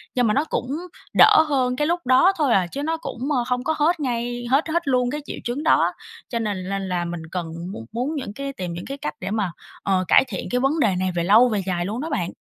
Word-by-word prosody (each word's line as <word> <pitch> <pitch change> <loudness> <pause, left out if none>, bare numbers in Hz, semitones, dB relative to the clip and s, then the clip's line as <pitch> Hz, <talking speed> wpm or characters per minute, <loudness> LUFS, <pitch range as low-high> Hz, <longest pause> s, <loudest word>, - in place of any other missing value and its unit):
Nhưng 245 -2 +3
mà 210 - +2
nó 285 - +2
cũng 250 - -3 0.5
đỡ - - +7
hơn 255 -3 +1
cái 295 +3 0
lúc 345 +1 +1
đó 260 +9 +5
thôi 285 -6 +2
à, 185 -3 +3
chứ 280 +11 -5
nó 325 +2 -1
cũng, 320 - -7 0.2
a, 240 - +1
không 250 0 -1
có 315 - 0
hết 320 +3 +2
ngay 240 -2 -2
hết 280 +5 +3
hết 340 -1 -1
luôn 250 -2 +2
cái 295 - -3
triệu - - -6
chứng 245 +5 -3
đó, 320 - +3 0.4
cho 235 - -2
nên 200 -4 -3
nên 195 -1 -3
là 175 -1 -1
mình 170 -1 -5
cần 175 -3 -3 0.2
muốn 115 - -8
muốn 255 +7 -2
những 255 -8 -5
cái 275 +3 -5
tìm 180 -5 -5
những 175 - -6
cái 275 +1 -6
cách 150 - -4
để 190 +2 -4
mà, 205 -5 -1 0.3
ờ, 190 -2 +1
cải - - +6
thiện - - -5
cái 250 - +1
vấn 300 +4 +2
đề 205 -8 +3
này 185 0 0
về 170 - 0
lâu 220 +7 +6
về 210 -3 0
dài 175 -2 -1
luôn 220 +6 -3
đó 320 - -4
bạn. 175 - -2
245 Hz, 270 wpm, -23 LUFS, 190-280 Hz, 0.5 s, đỡ